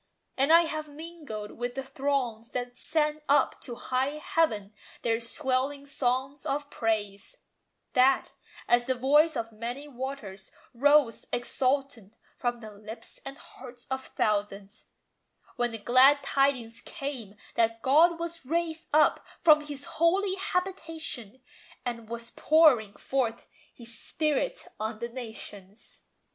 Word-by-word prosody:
And 275 +3 +3
I 335 +1 +8
have 310 -2 -4
mingled 295 -9 -8
with 245 0 -3
the 270 - -3
throngs 265 -4 -2
that 245 0 -3
sent 305 +2 0
Up 285 -1 +3
to 240 - -6
high 260 +4 -1
heaven 220 -11 0 0.3
their 225 -1 +1
swelling 265 +3 -1
song 265 0 -1
of 290 +1 -2
praise, 215 - -2 0.6
That, 265 0 +4 0.4
as 240 0 +3
"the 260 - +1
voice 295 +5 +4
of 230 0 -3
many 240 +6 -6
waters," 250 -8 -7 0.2
rose 285 -1 +3
Exultant 255 -3 -1 0.2
from 240 -1 -2
the 215 -1 -9
lips 215 +2 -9
and 275 +1 -8
hearts 245 -1 -13
of 265 0 -2
thousands, 205 -1 -2 0.7
When 240 0 +1
the 225 - -6
glad 260 +6 +5
tidings 270 -5 +1
came 275 - -6 0.2
that 230 0 +1
"God 325 +6 +5
was 335 0 -4
raised 325 +3 -2
Up 305 +1 +4 0.2
from 305 -2 +6
His 290 -2 -7
holy 375 +4 +2
habitation" 325 - -4 0.4
and 230 -2 -4
Was 235 0 -6
pouring 275 -10 +4
forth 240 -4 -2 0.2
His 235 -1 -7
Spirit 310 - -1
on 220 +1 -3
the 235 +2 -4
nations. 220 -4 -9
260 Hz, 130 wpm, -28 LUFS, 230-295 Hz, 0.7 s, I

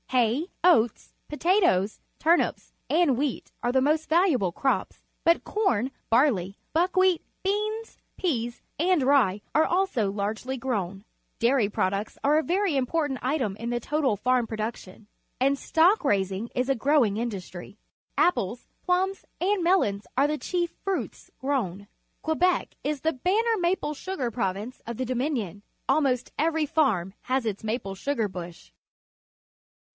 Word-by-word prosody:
Ha}% 255 - +1
oats^ 240 -11 +3 0.2
potatoes, 300 - +2 0.2
turnips, 335 +2 +1 0.2
and 320 -4 +3
wheat 280 -2 -2
are 240 - +2
the 260 - +3
most 305 +4 +1
valuable 315 - +3
crops, 265 +9 -1 0.2
but 335 +1 +3
corn, 270 - +1 0.2
barley, 225 -7 +2 0.2
buckwheat, 365 +1 +3 0.2
beans, 425 +3 -2 0.2
peas, 240 -9 -2 0.2
and 350 -3 +3
rye 255 -8 +3
are 310 - +6
also 345 - +1
largely 215 +6 -3
grown. 200 -6 -3 0.3
Dairy 235 -3 +3
products 200 +1 -1
are 295 +2 +4
a - - -1
very 370 -1 +1
important 270 0 0
item 255 -7 -1
in 230 +2 -4
the 240 0 0
total 275 -3 0
farm 250 +2 +1
production, 215 -2 -6 0.3
and 275 +2 +3
stock 345 +9 +3
raising 200 -2 0
is 250 0 0
a 270 - +2
growing 260 -4 +3
industry. 200 -4 -5 0.4
Apples, 240 - +1 0.2
plums, 375 +2 0 0.2
and 385 0 +1
mel 365 +2 +4
ons 200 0 -4
are 275 +2 +4
the 300 0 -1
chief 345 +2 -2
fruits 390 -2 -3
grown. 205 -8 -2 0.4
Quebec 350 +3 +1
is 295 -2 -2
the 320 +1 +1
banner 435 - +1
maple 345 -3 0
sugar 300 -5 -3
province 210 +2 -3
of 235 -1 -5
the 260 - -1
Dominion. 245 - -2 0.3
Almost 265 -5 +1
every 320 0 +2
farm 245 - +1
has 255 -1 -1
its 210 -2 -3
maple 215 -3 -3
sugar 230 +1 -1
bush. 175 - -9
265 Hz, 140 wpm, -26 LUFS, 215-330 Hz, 0.4 s, are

